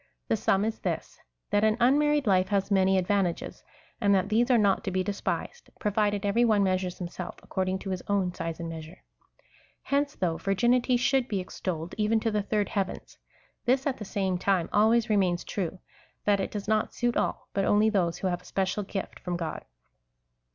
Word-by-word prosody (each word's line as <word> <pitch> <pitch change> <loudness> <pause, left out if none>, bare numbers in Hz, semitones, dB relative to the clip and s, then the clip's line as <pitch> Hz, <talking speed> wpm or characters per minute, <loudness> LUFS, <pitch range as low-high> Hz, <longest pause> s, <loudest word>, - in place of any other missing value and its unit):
The - - +3
sum 195 +2 +2
is 220 0 -3
this, 175 -4 -4 0.3
that 205 +1 +3
an 220 +1 +3
unmarried 290 +3 +3
life 185 -3 +3
has 200 -1 0
many 190 -1 +4
advantages, 185 -1 -1 0.4
and 200 -2 +4
that 190 +1 +1
these 235 +3 +2
are 250 - +5
not 200 -3 +2
to - - 0
be 185 0 0
despised, 200 +1 -4
provided 205 -1 0
every 205 +4 +3
one 215 -4 +4
measures 185 -1 0
himself 175 0 -6
according 185 0 -1
to 190 0 -6
his 185 -1 -3
own 195 -3 +1
size 165 -1 -5
and 170 - -4
measure. 165 +2 -9 0.3
^ - - -33 0.4
Hence, 285 +1 0
though 170 -3 -1
virginity 240 +5 +2
should 255 +1 +2
be 200 -5 -1
ex 185 - -8
tolled 170 -2 -3
even 215 +1 +3
to 225 - 0
the 210 0 +1
third 205 0 -1
heavens, 195 -3 -4 0.5
this, 260 +2 +2
at 275 -3 0
the - - -6
same 190 -2 -1
time, 185 -2 +1
always 220 +2 +4
remains 190 -5 +1
true 190 -2 -3 0.2
— - - -34
that 205 -1 +3
it - - -1
does 205 -1 -5
not 215 0 0
suit 240 -1 0
all, - - -1
but 195 - +1
only 210 +2 +4
those 175 -5 +1
who 190 - -2
have 175 -1 -2
a - - -21
special 195 +2 -1
gift 195 -1 -5
from 175 -1 -3
God. 165 -2 -4
200 Hz, 200 wpm, -28 LUFS, 185-220 Hz, 0.5 s, are